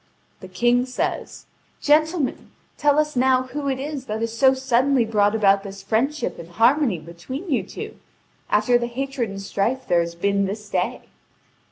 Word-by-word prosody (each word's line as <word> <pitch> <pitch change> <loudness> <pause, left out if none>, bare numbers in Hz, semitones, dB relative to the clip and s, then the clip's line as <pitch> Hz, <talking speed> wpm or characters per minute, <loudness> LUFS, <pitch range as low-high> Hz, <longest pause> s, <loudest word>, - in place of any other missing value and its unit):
The 185 - -10
King 240 +7 +2
says: 255 - -3 0.3
"Gentlemen, 310 0 +1 0.3
tell 295 -1 +2
us 300 -1 +1
now 255 0 +3
who 280 +2 -4
it 265 - -1
is 280 -1 -5
that 215 +1 -3
has 230 0 -3
so 265 +2 +5
suddenly 260 0 +2
brought 210 -1 +2
about 200 -2 +4
this 195 -1 -9
friendship 250 +9 -1
and 170 0 -9
harmony 235 - +3
between 175 - -8
you 260 - +2
two, - - -8 0.5
after 245 -1 +3
the 240 - -2
hatred 260 -1 -3
and 195 0 -7
strife 225 +6 -2
there 175 - +3
has 170 0 -2
been 200 +3 +1
this 210 +2 -6
day?" - - -1
240 Hz, 170 wpm, -23 LUFS, 200-270 Hz, 0.5 s, so